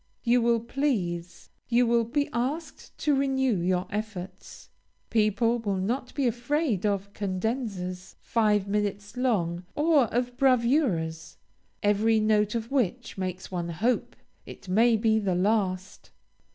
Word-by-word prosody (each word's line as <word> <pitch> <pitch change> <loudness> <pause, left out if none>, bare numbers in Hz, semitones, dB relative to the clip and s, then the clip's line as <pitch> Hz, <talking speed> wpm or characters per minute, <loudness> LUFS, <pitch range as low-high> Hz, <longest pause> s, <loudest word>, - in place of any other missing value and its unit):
You 245 0 +3
will 235 -1 +2
please 205 -10 -2 0.2
you 245 +1 +4
will 235 0 +2
be 285 +5 0
asked 280 +7 -4
to 300 - +1
renew 265 -4 +1
your 180 +1 0
efforts. 205 -3 -7 0.4
People 230 +2 +2
will 200 -4 -2
not 240 +7 -2
be 280 -2 0
afraid 240 - 0
of 200 0 -2
cadenzas 195 -2 -3
five 210 -4 +1
minutes 205 0 -2
long, 185 -9 0
or 300 -3 +4
of 245 +2 -2
bravuras, 235 - +1 0.5
every 215 +2 +3
note 215 0 +2
of 230 +1 -3
which 245 -2 -1
makes 185 0 -4
one 175 -2 -3
hope 225 +9 -1 0.3
it - - -12
may 225 +5 +4
be 220 0 +2
the 195 -4 0
last. 190 -1 -1
220 Hz, 130 wpm, -27 LUFS, 190-245 Hz, 0.5 s, you